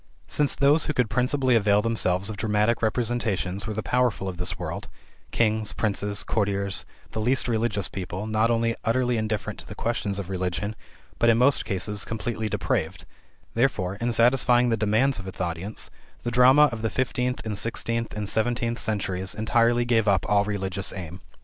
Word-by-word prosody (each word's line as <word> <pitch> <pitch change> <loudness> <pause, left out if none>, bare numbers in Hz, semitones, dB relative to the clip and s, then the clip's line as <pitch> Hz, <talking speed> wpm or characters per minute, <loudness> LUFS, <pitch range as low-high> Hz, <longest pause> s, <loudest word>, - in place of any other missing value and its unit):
Since 145 -2 +2
those 145 +3 +4
who 150 - 0
could 125 -6 0
principally 125 +2 +2
avail 105 -1 +3
themselves 100 -3 0
of - - -6
dramatic 105 +2 +1
representations 110 -4 -1
were 110 - -4
the 110 - -3
powerful 125 -6 +1
of 90 -2 -5
this 90 +1 -3
world: - - -5 0.4
kings, 110 -2 0
princes, 100 -1 -1
courtiers, 100 -5 -1 0.3
the 110 - -3
least 125 +4 +2
religious 110 -5 0
people, 95 +1 -5
not 110 +1 +1
only 115 0 +1
utterly 125 +1 +1
indifferent 110 -2 -2
to - - -10
the - - -8
questions 115 -4 -2
of 100 -3 -4
religion, 95 +3 -3 0.4
but 115 - +4
in 115 - +5
most 130 +3 +3
cases 100 +1 -1
completely 110 -1 -3
depraved - - -2 0.5
therefore, 100 -7 0
in 120 +3 -1
satisfying 120 +1 +4
the 115 - +2
demands 110 +5 +1
of 95 - -8
its 95 - -8
audience, 85 +5 -4 0.3
the 120 - -2
drama 130 +5 +6
of 115 -1 -5
the 115 - 0
fifteenth 125 0 -1
and 110 -2 -2
sixteenth 115 +1 -1
and 105 -1 -3
seventeenth 115 +2 0
centuries 95 -4 -2
entirely 120 +2 +2
gave 115 -3 +2
up 95 -3 +3
all 105 -1 +3
religious 100 -2 -2
aim. 90 0 -7
110 Hz, 175 wpm, -25 LUFS, 100-120 Hz, 0.5 s, drama